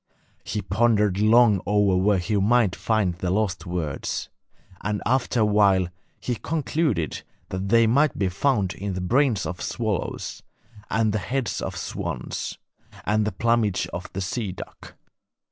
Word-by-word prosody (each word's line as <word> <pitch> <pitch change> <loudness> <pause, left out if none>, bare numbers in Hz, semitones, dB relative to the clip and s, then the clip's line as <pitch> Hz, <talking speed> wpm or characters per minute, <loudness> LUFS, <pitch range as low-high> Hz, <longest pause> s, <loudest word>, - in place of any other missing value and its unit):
He 105 - -3
pondered 105 -2 +2
long 110 -2 +5
over 105 -2 +3
where 95 +2 +3
he 90 +4 -1
might 105 -1 +3
find 110 -5 +1
the 90 +1 -3
lost 95 -2 -1
words, 85 -5 -3 0.5
and 105 0 -1
after 125 0 +1
a - - +5
while 100 -4 +3 0.3
he 125 - -2
concluded 145 - -1 0.3
that 95 +1 -3
they 115 +1 +5
might 140 +7 +3
be 95 - +1
found 100 -1 +1
in 100 0 -4
the - - -2
brains 120 +1 +2
of 90 0 -5
swallows 110 -5 -3 0.5
and 110 -1 +1
the 110 - 0
heads 120 +4 -2
of - - -4
swans - - -4 0.5
and 105 0 +2
the 105 - 0
plumage 115 -4 +1
of 90 +1 -6
the 95 - -3
sea 100 +2 -2
duck. 95 - -10
105 Hz, 150 wpm, -24 LUFS, 95-115 Hz, 0.5 s, long